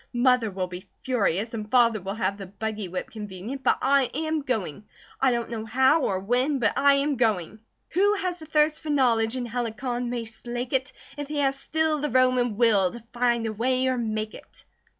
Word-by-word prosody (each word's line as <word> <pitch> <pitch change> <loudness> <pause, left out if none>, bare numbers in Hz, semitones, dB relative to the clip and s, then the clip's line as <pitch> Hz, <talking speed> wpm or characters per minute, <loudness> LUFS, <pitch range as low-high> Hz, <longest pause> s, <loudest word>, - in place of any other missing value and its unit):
Mother 250 -2 +3
will 190 -1 -3
be 180 +1 -9
furious 225 -4 0
and 215 -2 -5
Father 235 -4 +4
will 195 +2 -4
have 200 -1 -1
the 195 - -7
buggy 210 +1 -4
whip 180 +1 -5
convenient; 210 +4 -7
but - - +3
I 275 -2 +3
am 315 0 -1
going! 215 - -3 0.4
I 265 -1 +4
don't 235 -1 -2
know 225 -2 -3
how, 265 +7 +3
or 190 -7 0
when, 250 +8 +1
but 220 -5 +1
I 280 0 +5
am 280 0 0
GOING. 215 -4 0 0.3
"Who 405 +4 +3
has 365 -3 -3
a 315 - -10
thirst 305 0 +2
for 315 - -7
knowledge, 245 -4 +2
in 250 - -3
Helicon 240 +1 -3
may 240 -1 -3
slake 240 +3 -6
it, 265 +1 0 0.3
If 290 -1 -4
he 300 0 -4
has 275 -1 +1
still, 315 +1 0
the 295 +1 -1
Roman 255 -3 +2
will, 210 -6 +3
to 235 -2 -9
find 240 -1 +1
a 220 - -2
way, 255 +4 +1
or 255 - +1
make 215 -1 -2
it." - - -14
240 Hz, 205 wpm, -26 LUFS, 215-270 Hz, 0.4 s, I